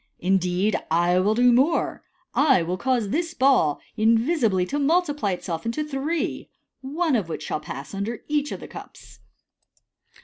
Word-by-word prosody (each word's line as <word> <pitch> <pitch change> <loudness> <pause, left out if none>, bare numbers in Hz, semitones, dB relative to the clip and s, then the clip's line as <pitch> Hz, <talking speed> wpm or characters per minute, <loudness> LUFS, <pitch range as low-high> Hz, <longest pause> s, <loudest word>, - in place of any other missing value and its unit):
Indeed, 185 +2 +1
I 175 +2 +3
will 205 +4 +2
do 245 +1 +5
more 275 +7 +1 0.3
j 255 - +2
I 270 - +4
will 175 +2 -2
cause 240 0 0
this 335 - -2
ball 255 - +3 0.2
invisibly 225 - +2
to 285 +10 -3
multiply 295 - +1
itself 170 -2 -5
into 230 +7 -2
three, 300 +4 -3 0.3
one 300 +3 0
of 200 -8 -1
which - - -5
shall - - -3
pass 140 0 -8
under 205 +4 -4
each 295 -1 -1
of - - -6
the - - -8
cups. - - -12
230 Hz, 160 wpm, -24 LUFS, 185-290 Hz, 0.3 s, do